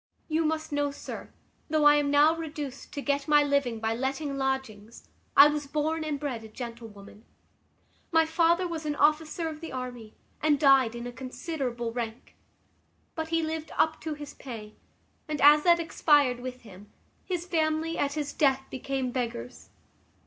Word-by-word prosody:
"You 320 0 0
must 315 0 -2
know, 290 0 0
sir, 280 - -8 0.4
though 305 -1 +2
I 295 - +9
am 290 -1 +1
now 295 +3 +5
reduced 295 -4 -6
to 285 - -4
get 280 -1 0
my 295 -1 +5
living 280 -5 0
by 220 0 -1
letting 270 +4 -2
lodgings, 265 -5 -4 0.3
I 280 +1 +11
was 295 -1 -2
born 310 +2 -1
and 300 -2 -3
bred 260 -6 -4
a - - -9
gentlewoman. 220 -3 -10 0.9
My 325 -1 +4
father 340 +2 +2
was 330 -2 -5
an 295 - -1
officer 310 +3 +1
of 310 -1 -7
the 330 - -7
army, 245 -4 -7 0.3
and 295 -2 +3
died 270 -5 +5
in 235 0 -6
a 245 - -5
considerable 255 -2 -4
rank: 230 -1 -6 0.8
but 320 -1 -4
he 330 0 0
lived 315 0 -4
up 315 0 +2
to 310 -1 -4
his 295 -1 -9
pay; 220 -5 -9 0.5
and, 305 -1 -3
as 295 +1 +7
that 340 -1 +6
expired 290 -6 +3
with 250 0 -7
him, 205 -1 -14 0.3
his 355 -2 -3
family, 320 -1 0
at 285 0 0
his 295 -1 -3
death, 270 -2 +2
became 260 0 -3
beggars. 125 - -5
285 Hz, 170 wpm, -28 LUFS, 245-315 Hz, 0.9 s, I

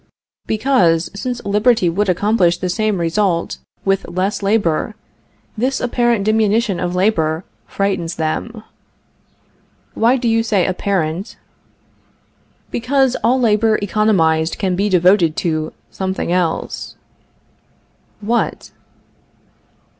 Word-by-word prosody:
Because, 200 -9 +2
since 245 +5 -5
liberty 210 0 +2
would 195 +4 0
accomplish 180 -1 +2
the 180 - -3
same 215 0 0
result 170 +1 0 0.3
with 195 -2 0
less 185 +4 -2
labor, 200 -1 0 0.6
this 255 +4 -1
apparent 240 -3 +1
diminution 215 -2 +1
of 175 0 -2
labor 170 -4 +1 0.2
frightens 185 -4 -2
them. 215 +8 -3 1.3
Why 235 +4 +3
do 240 - -2
you 225 0 +3
say 210 -5 +1
apparent? 185 -1 -2 1.3
Because 265 +1 +1
all 250 +4 +3
labor 220 -2 +3
economized 185 -6 +1
can 185 -3 -1
be 200 +3 0
devoted 180 -3 +3
to 155 -2 -1 0.2
something 190 -2 -3
else. 175 -2 -2 1.3
What? 230 +3 -2
200 Hz, 100 wpm, -18 LUFS, 175-225 Hz, 1.3 s, Why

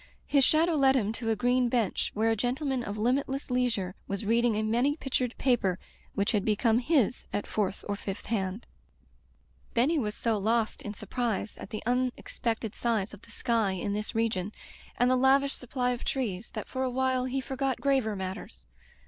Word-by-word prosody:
His 280 -2 +4
shadow 325 +5 +4
led 270 -3 +4
him 215 -5 +1
to 225 0 -3
a 220 - +3
green 245 +2 +2
bench 230 -5 0
where 225 +2 +2
a - - +2
gentleman 255 +3 -1
of 205 -2 -4
limitless 265 +4 0
leisure 230 -7 0
was 200 +2 -3
reading 230 +1 +3
a 215 - 0
many 240 +7 +2
pictured 255 -4 -1
paper 210 -9 +2 0.4
which 200 +1 +1
had 210 -4 +1
become 220 +2 +3
his 255 - +1
at 205 - -2
fourth 205 -2 -2
or 205 - -1
fifth 195 -1 -6
hand. 200 -1 -2 1.1
Benny 285 +7 +3
was 210 -4 -2
so 225 -3 0
lost 225 +2 +1
in 205 0 -6
surprise 230 -3 -2
at - - -8
the 215 - -5
un 250 +1 +2
expected 225 -2 -3
size 220 -5 -1
of 205 - -11
the - - -18
sky 230 -3 +1
in 190 +2 -2
this 210 +1 -3
region, 215 -4 0 0.5
and 245 +1 +4
the - - +5
lavish 270 +2 +4
supply 250 0 -1
of 245 - -3
trees, 225 -6 -2
that - - -4
for 260 - -4
awhile 260 0 +1
he 260 +1 -1
forgot 265 -1 -2
graver 265 -6 +1
matters. 185 - -6
235 Hz, 185 wpm, -29 LUFS, 210-255 Hz, 1.1 s, the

